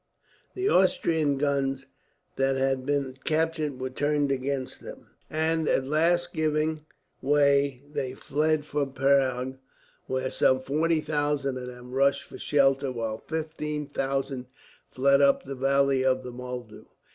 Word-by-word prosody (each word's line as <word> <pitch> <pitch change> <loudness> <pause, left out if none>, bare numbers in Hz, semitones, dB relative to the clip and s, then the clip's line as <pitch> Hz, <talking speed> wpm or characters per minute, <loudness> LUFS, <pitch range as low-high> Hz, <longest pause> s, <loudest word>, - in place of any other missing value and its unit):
The 380 +1 -1
Austrian 160 - +2
guns 135 -1 0 0.5
that 135 0 +1
had 135 0 0
been 140 -2 -1
captured 155 -3 0
were 130 0 -3
turned 145 +1 0
against 135 0 -3
them - - -11 0.2
and, 160 0 0
at 130 - +2
last 170 +4 +1
giving 155 0 0 0.3
way 140 -1 +3
they 135 -3 -4
fled 150 +2 0
for 145 -2 -1
Prague, 130 -1 +1 0.5
where 130 0 -2
some 130 - +3
40,000 150 -1 0
of 125 -1 -6
them 125 0 -10
rushed 140 +2 +2
for - - -12
shelter, 135 -1 +2
while 115 -2 -3
15,000 150 -4 -3 0.4
fled 140 +2 +3
up 140 0 +4
the 135 - -6
valley 135 0 +2
of 130 0 +2
the 125 - -6
Moldau. 125 -3 -8
140 Hz, 130 wpm, -27 LUFS, 130-150 Hz, 0.5 s, up